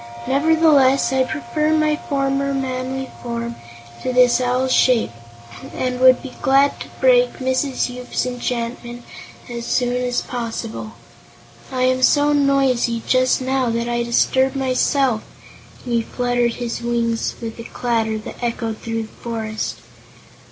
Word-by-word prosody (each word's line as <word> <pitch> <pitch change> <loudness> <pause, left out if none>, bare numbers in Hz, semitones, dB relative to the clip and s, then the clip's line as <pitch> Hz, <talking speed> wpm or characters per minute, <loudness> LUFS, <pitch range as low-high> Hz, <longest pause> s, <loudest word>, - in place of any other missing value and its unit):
Nevertheless, 275 -2 +3
I 260 0 +3
prefer 305 +2 -1
my 305 -1 +2
former 275 -1 -1
manly 260 0 -3
form 235 0 -4 0.4
to 255 - -2
this 250 -1 +4
owl's 255 +1 +1
shape 245 - +3 0.6
and 250 -1 -2
would 255 0 +6
be 265 - -8
glad 275 +1 +3
to - - -7
break - - +4
Mrs. 260 +1 0
Yoop's 250 0 -3
enchantment 240 -1 -4 0.4
as 235 -1 -6
soon 245 0 +1
as 250 -1 -1
possible. 230 -2 -5 0.8
I 255 -1 -1
am 255 0 +2
so 290 +3 +4
noisy, 270 -5 +2
just 255 0 +3
now, 260 -1 0
that 230 +1 -1
I 240 0 0
disturb 260 +3 +2
myself," 260 -2 +1 0.6
and 245 - -3
he 235 - +3
fluttered 245 0 -1
his 240 -1 -4
wings 235 -1 -1
with 230 -1 -7
a - - -6
clatter 225 -2 -1
that 215 - -9
echoed 230 -2 -3
throughout 225 0 -3
the - - -19
forest. 220 -2 -4
250 Hz, 135 wpm, -20 LUFS, 235-265 Hz, 0.8 s, would